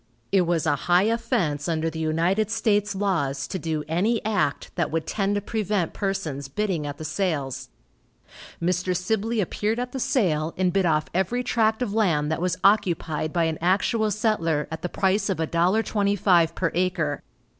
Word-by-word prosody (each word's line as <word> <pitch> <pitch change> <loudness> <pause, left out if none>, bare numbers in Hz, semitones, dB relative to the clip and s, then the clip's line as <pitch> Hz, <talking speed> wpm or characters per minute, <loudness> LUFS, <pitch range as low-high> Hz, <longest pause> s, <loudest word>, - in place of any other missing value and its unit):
It 185 -3 +3
was 170 -2 +1
a 150 -2 +3
high 175 +2 +5
offense 200 - 0
under 160 -1 0
the 160 0 -4
United 170 +7 +1
States 210 -2 +1
laws 155 -9 -1
to 190 - -4
do 155 -2 -2
any 200 +9 +1
act 205 -10 0
that - - -1
would 160 0 -2
tend 200 -1 -1
to 205 - 0
prevent 205 -4 -1
persons 180 -9 -3
bidding 170 0 -2
at 145 0 -6
the 155 - -7
sales. 155 -6 -2 0.9
Mr. 180 +1 0
Sibley 220 +4 0
appeared 210 +4 -1
at 250 0 -3
the 265 - -4
sale, 165 - 0
and 180 -1 +1
bid 195 -2 +2
off 155 -1 +2
every 190 +7 0
tract 225 -1 +1
of 210 -5 -3
land 160 -9 +1
that 160 - -1
was 180 0 0
occupied 175 -6 +2
by 170 0 +1
an 160 -1 -1
actual 210 +5 +2
settler 180 -8 0
at 160 - -5
the 180 - -3
price 195 +3 +1
of 195 - 0
$1.25 185 0 +2
per 165 -3 0
acre. 170 -5 0
180 Hz, 175 wpm, -25 LUFS, 160-210 Hz, 0.9 s, high